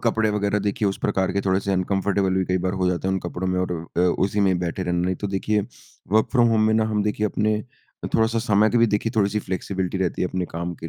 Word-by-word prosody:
कपड़े 110 Hz, -2 st, +2 dB
वगैरह 105 Hz, 0 st, 0 dB
देखिए 100 Hz, 0 st, 0 dB
उस 95 Hz, -, -3 dB
प्रकार 95 Hz, -1 st, 0 dB
के 100 Hz, -, 0 dB
थोड़े 95 Hz, -1 st, +1 dB
से 100 Hz, -, -2 dB
अनकम्फर्टेबल 95 Hz, 0 st, 0 dB
भी 95 Hz, 0 st, +1 dB
कई 90 Hz, +1 st, 0 dB
बार 95 Hz, -, 0 dB
हो 90 Hz, -, +3 dB
जाते 90 Hz, +1 st, -2 dB
हैं 95 Hz, -, +1 dB
उन 95 Hz, -, 0 dB
कपड़ों 90 Hz, +1 st, -4 dB
में 90 Hz, 0 st, 0 dB
और 90 Hz, -1 st, -1 dB, 0.2 s
अ, -, -, +3 dB
उसी 95 Hz, +3 st, +1 dB
में 95 Hz, -3 st, +3 dB
बैठे 90 Hz, +1 st, -3 dB
रहना। 90 Hz, -1 st, 0 dB
नहीं 95 Hz, -, 0 dB
तो 100 Hz, -, -4 dB
देखिए 105 Hz, +2 st, +1 dB, 0.5 s
वर्क 110 Hz, -, +4 dB
फ्रॉम 120 Hz, -3 st, +4 dB
होम 110 Hz, -1 st, +3 dB
में 110 Hz, -, +3 dB
ना 110 Hz, -, +3 dB
हम 105 Hz, -1 st, +1 dB
देखिए 105 Hz, +1 st, 0 dB
अपने 105 Hz, +1 st, 0 dB, 0.5 s
अ, -, -, -1 dB
थोड़ा-सा 115 Hz, +1 st, +2 dB
समय 110 Hz, -1 st, +3 dB
के 120 Hz, -, +2 dB
भी 115 Hz, -, +5 dB
देखिए 105 Hz, +1 st, -1 dB
थोड़ी-सी 105 Hz, 0 st, +2 dB
फ्लेक्सिबिलिटी 95 Hz, 0 st, -3 dB
रहती 95 Hz, -2 st, -1 dB
है 90 Hz, -, 0 dB
अपने 90 Hz, 0 st, -2 dB
काम 85 Hz, +1 st, -3 dB
के 80 Hz, -, -4 dB
100 Hz, 265 wpm, -23 LUFS, 90-105 Hz, 0.5 s, भी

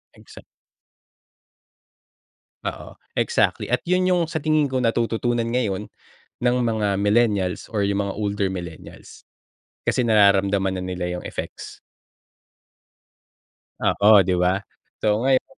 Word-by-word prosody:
Exactly. -, -, -15 dB, 2.2 s
Oo -, -, -6 dB, 0.2 s
exactly. 470 Hz, -, 0 dB
At -, -, +2 dB
yun 180 Hz, +1 st, +2 dB
yung 180 Hz, -2 st, +3 dB
sa 160 Hz, -2 st, -4 dB
tingin 155 Hz, -2 st, +2 dB
ko, 130 Hz, -1 st, -1 dB
natututunan 115 Hz, 0 st, 0 dB
ngayon 105 Hz, -5 st, -1 dB, 0.5 s
ng 125 Hz, 0 st, +2 dB
mga 110 Hz, -4 st, 0 dB
millennials 105 Hz, -3 st, +1 dB
or 105 Hz, -3 st, -1 dB
yung 100 Hz, 0 st, 0 dB
mga 100 Hz, -, -4 dB
older 100 Hz, -1 st, -1 dB
millennials. 85 Hz, -3 st, -10 dB, 0.6 s
Kasi 125 Hz, -, +2 dB
nararamdaman 100 Hz, -3 st, +3 dB
na 90 Hz, -, -4 dB
nila 90 Hz, -1 st, -3 dB
yung -, -, -10 dB
effects. -, -, -7 dB, 2.0 s
Oo, 105 Hz, -1 st, +5 dB
'di 95 Hz, -, +1 dB
ba? 90 Hz, +2 st, +2 dB, 0.4 s
So 105 Hz, +1 st, +1 dB
ngayon 130 Hz, -1 st, +3 dB
105 Hz, 115 wpm, -23 LUFS, 95-120 Hz, 2.2 s, Oo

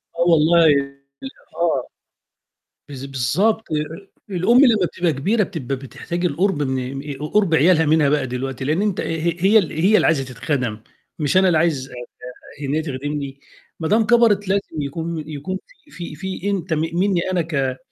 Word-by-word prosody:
آه 170 Hz, -, -3 dB
والله 165 Hz, +1 st, +5 dB, 0.9 s
آه. 160 Hz, -7 st, 0 dB, 1.0 s
بالض 135 Hz, -1 st, -7 dB
بالضبط، 140 Hz, -, 0 dB
أ -, -, +1 dB, 0.6 s
أ -, -, -5 dB
الأم 185 Hz, +7 st, +3 dB
لمّا 225 Hz, -9 st, +5 dB
بتبقى 170 Hz, -1 st, -1 dB
كبيرة 205 Hz, -, +1 dB
بتبقى 150 Hz, -9 st, -4 dB
بتحتاج 170 Hz, +6 st, -5 dB
القرب 175 Hz, -1 st, 0 dB
من 130 Hz, 0 st, -3 dB
آآ 135 Hz, -, -5 dB
ق 150 Hz, +1 st, -7 dB
قرب 200 Hz, -6 st, +3 dB
عيالها 160 Hz, +1 st, +4 dB
منها 150 Hz, -1 st, +3 dB
بقى 145 Hz, -3 st, +1 dB
دلوقتي، 130 Hz, +1 st, -4 dB
لأن 155 Hz, +7 st, +1 dB
أنت 210 Hz, -3 st, 0 dB
ه -, -, -3 dB
هي 165 Hz, +1 st, -1 dB
هي 200 Hz, +4 st, +5 dB
ال 190 Hz, -7 st, +1 dB
هي 185 Hz, +7 st, +3 dB
اللي -, -, +4 dB
عايزة 145 Hz, -5 st, +2 dB
تتخَدم، 125 Hz, -3 st, -3 dB, 0.4 s
مش 150 Hz, +3 st, +1 dB
أنا 190 Hz, 0 st, +5 dB
اللي 175 Hz, -3 st, +3 dB
عايز 155 Hz, -5 st, 0 dB
أت 120 Hz, -1 st, -11 dB, 0.5 s
إن 140 Hz, +1 st, -2 dB
هي 160 Hz, -, +1 dB
تخدمني، 140 Hz, -1 st, -5 dB, 0.4 s
ما 160 Hz, -, -2 dB
دام 220 Hz, +4 st, +3 dB
كبرت 210 Hz, -3 st, +3 dB
لازم 195 Hz, -5 st, -1 dB
يكون 160 Hz, +2 st, -4 dB
يكون 155 Hz, +5 st, -4 dB
في -, -, -25 dB
في 170 Hz, -3 st, -8 dB
في 190 Hz, +4 st, -4 dB
أنت 185 Hz, -4 st, -2 dB
م 155 Hz, -, 0 dB
مني 180 Hz, 0 st, +1 dB
أنا 180 Hz, -, +1 dB
ك 135 Hz, -5 st, -2 dB
160 Hz, 180 wpm, -21 LUFS, 140-185 Hz, 1.0 s, والله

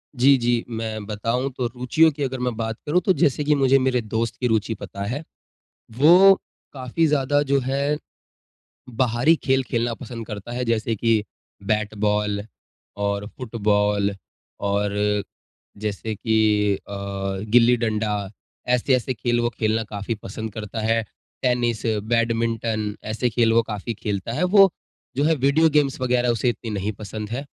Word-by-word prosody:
जी, 135 Hz, +2 st, +5 dB
जी। 120 Hz, -1 st, +1 dB
मैं 110 Hz, -2 st, -4 dB
बताऊँ 115 Hz, +5 st, -1 dB
तो 125 Hz, -, 0 dB
रुचियों 125 Hz, +7 st, +3 dB
की 145 Hz, 0 st, -4 dB
अगर 130 Hz, -1 st, -3 dB
मैं 125 Hz, -2 st, -1 dB
बात 110 Hz, -1 st, -3 dB
करूँ 165 Hz, +4 st, +2 dB
तो 190 Hz, -, +4 dB
जैसे 145 Hz, -3 st, +1 dB
कि 150 Hz, 0 st, +3 dB
मुझे 135 Hz, -1 st, +4 dB
मेरे 130 Hz, -1 st, +1 dB
दोस्त 115 Hz, +1 st, -2 dB
की 125 Hz, -, +1 dB
रुचि 110 Hz, -1 st, 0 dB
पता 100 Hz, -1 st, -7 dB
है। 135 Hz, +9 st, -3 dB, 0.7 s
वो 180 Hz, +8 st, +8 dB, 0.4 s
काफ़ी 135 Hz, +4 st, -1 dB
ज़्यादा 145 Hz, -1 st, +2 dB
जो 140 Hz, -, +4 dB
है 140 Hz, +3 st, 0 dB, 0.9 s
बाहरी 125 Hz, +5 st, +2 dB
खेल 135 Hz, -1 st, +2 dB
खेलना 120 Hz, -1 st, -1 dB
पसंद 115 Hz, -1 st, -8 dB
करता 105 Hz, +1 st, -7 dB
है, 125 Hz, +1 st, -2 dB
जैसे 115 Hz, -1 st, 0 dB
कि 110 Hz, 0 st, +2 dB, 0.4 s
बैट-बॉल 105 Hz, 0 st, 0 dB, 0.6 s
और 100 Hz, 0 st, -1 dB
फुटबॉल 105 Hz, -4 st, +1 dB, 0.5 s
और 105 Hz, 0 st, 0 dB, 0.5 s
जैसे 105 Hz, +1 st, -4 dB
कि 105 Hz, -1 st, +2 dB
अ, -, -, -13 dB, 0.7 s
गिल्ली-डंडा, 110 Hz, -4 st, +2 dB, 0.4 s
ऐसे-ऐसे 125 Hz, +1 st, +1 dB
खेल 120 Hz, 0 st, 0 dB
वो 120 Hz, -, +1 dB
खेलना 110 Hz, 0 st, +1 dB
काफ़ी 105 Hz, +2 st, -3 dB
पसंद 110 Hz, +3 st, -6 dB
करता 110 Hz, +1 st, -5 dB
है। 115 Hz, +1 st, +2 dB, 0.4 s
टेनिस, 120 Hz, -3 st, +1 dB
बैडमिंटन, 115 Hz, -1 st, 0 dB
ऐसे 110 Hz, +3 st, -1 dB
खेल 115 Hz, 0 st, +2 dB
वो 115 Hz, -, +5 dB
काफ़ी 110 Hz, +1 st, -5 dB
खेलता 100 Hz, 0 st, -4 dB
है। 150 Hz, +8 st, 0 dB
वो 195 Hz, +1 st, +6 dB, 0.5 s
जो 140 Hz, -, +2 dB
है 160 Hz, +2 st, +4 dB
वीडियो 145 Hz, +4 st, +3 dB
गेम्स 145 Hz, -3 st, +1 dB
वग़ैरह 125 Hz, -1 st, +1 dB
उसे 120 Hz, +1 st, +1 dB
इतनी 115 Hz, -1 st, -5 dB
नहीं 100 Hz, 0 st, -2 dB
पसंद 105 Hz, +1 st, -7 dB
है, 120 Hz, +4 st, -3 dB
115 Hz, 150 wpm, -23 LUFS, 105-130 Hz, 0.9 s, वो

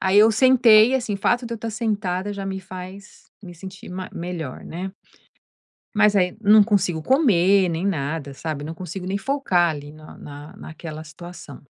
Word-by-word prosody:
Aí 190 Hz, +1 st, +3 dB
eu 220 Hz, +2 st, +6 dB
sentei, 240 Hz, -1 st, +6 dB
assim, 235 Hz, -5 st, -1 dB
o -, -, -2 dB
fato 240 Hz, +5 st, 0 dB
de 235 Hz, -, -6 dB
eu -, -, -1 dB
estar 225 Hz, +1 st, -5 dB
sentada 205 Hz, -4 st, -2 dB
já 200 Hz, -1 st, -6 dB
me 190 Hz, 0 st, -3 dB
faz 190 Hz, +1 st, -11 dB
me 175 Hz, -1 st, -10 dB
sentir 190 Hz, +3 st, -11 dB
ma 185 Hz, 0 st, -6 dB
melhor, 170 Hz, -6 st, -6 dB
né. 185 Hz, +3 st, -6 dB, 1.1 s
Mas 210 Hz, -1 st, +4 dB
aí 180 Hz, -2 st, +1 dB
não 210 Hz, 0 st, +7 dB
consigo 195 Hz, -6 st, +1 dB
comer 195 Hz, -, +3 dB
nem 170 Hz, +3 st, -2 dB
nada, 145 Hz, -5 st, -3 dB
sabe. 150 Hz, -1 st, -5 dB
Não 160 Hz, +2 st, -6 dB
consigo 180 Hz, +2 st, -7 dB
nem 195 Hz, -, -1 dB
focar 195 Hz, -8 st, +1 dB
ali 145 Hz, -1 st, -7 dB
na 155 Hz, 0 st, -14 dB
na 145 Hz, +5 st, -11 dB
naquela 155 Hz, -3 st, -9 dB
situação. 155 Hz, -3 st, -11 dB
185 Hz, 180 wpm, -22 LUFS, 165-210 Hz, 1.1 s, não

